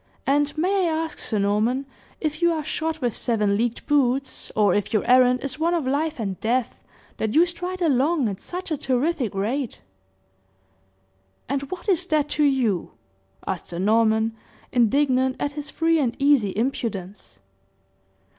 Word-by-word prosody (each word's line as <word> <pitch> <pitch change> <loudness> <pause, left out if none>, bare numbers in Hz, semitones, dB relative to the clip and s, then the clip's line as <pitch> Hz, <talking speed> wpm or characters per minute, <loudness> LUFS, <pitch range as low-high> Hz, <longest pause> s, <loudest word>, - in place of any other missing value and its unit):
"And 290 +2 +1
may 370 +2 +2
I - - -1
ask, 320 0 -3
Sir 215 - -2
Norman, 215 +7 +1 0.3
if 310 0 -3
you 340 0 +4
are 315 -2 -2
shod 320 +1 -2
with 240 -3 0
seven 210 -4 +1
leagued 235 +2 -1
boots, 275 -2 0
or 205 -4 +4
if 205 -1 -1
your 215 -3 +1
errand 250 0 +5
is 275 0 -4
one 340 +2 +2
of 325 -5 -1
life 300 +3 -1
and 195 -4 -3
death, 240 +2 -1 0.4
that 220 +3 -2
you 330 +3 +6
stride 355 +1 -4
along 290 -1 +2
at 195 -2 -5
such 360 -1 -6
a 310 - 0
terrific 265 - -1
rate?" 235 +6 -2 1.7
"And 275 0 -1
what 370 +2 -7
is 365 -2 +2
that 300 -3 +1
to 300 - +1
you?" 250 - +1 0.5
asked 185 -4 -4
Sir 170 - -6
Norman, 220 +3 +2 0.4
indignant 260 +2 +2
at 285 - -1
his 295 0 -7
free 330 +1 +1
and 250 -5 0
easy 275 -7 +3
impudence. 210 - -3
265 Hz, 160 wpm, -24 LUFS, 225-310 Hz, 1.7 s, you